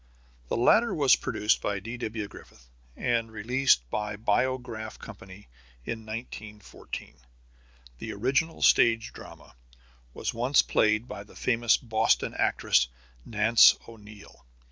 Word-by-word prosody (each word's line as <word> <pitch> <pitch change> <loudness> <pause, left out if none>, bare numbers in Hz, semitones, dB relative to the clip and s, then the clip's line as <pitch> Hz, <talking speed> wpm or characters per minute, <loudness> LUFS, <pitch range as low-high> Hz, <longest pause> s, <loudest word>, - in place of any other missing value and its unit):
The - - -2
latter 225 - +3
was 140 -4 +5
produced 105 +1 0
by 100 -1 -2
D.W. 110 0 -5
Griffith, - - -16 0.3
and 115 -2 -1
released 110 - +1
by 105 0 -2
the - - -8
Biograph 110 0 -2
Company 100 -2 -12 0.4
in 110 -1 -6
1914. 110 -2 -9 0.8
The 110 - -6
original 130 +10 -1
stage 115 -1 +4
drama - - -13 0.6
was - - -3
once 125 +4 +3
played 110 +2 +1
by 100 - -8
the 105 - -19
famous 120 -2 +2
Boston 110 -2 0
actress, 60 - +2 0.4
Nance 110 +1 +5
O'Neil. 105 - -15
110 Hz, 120 wpm, -27 LUFS, 105-120 Hz, 0.8 s, was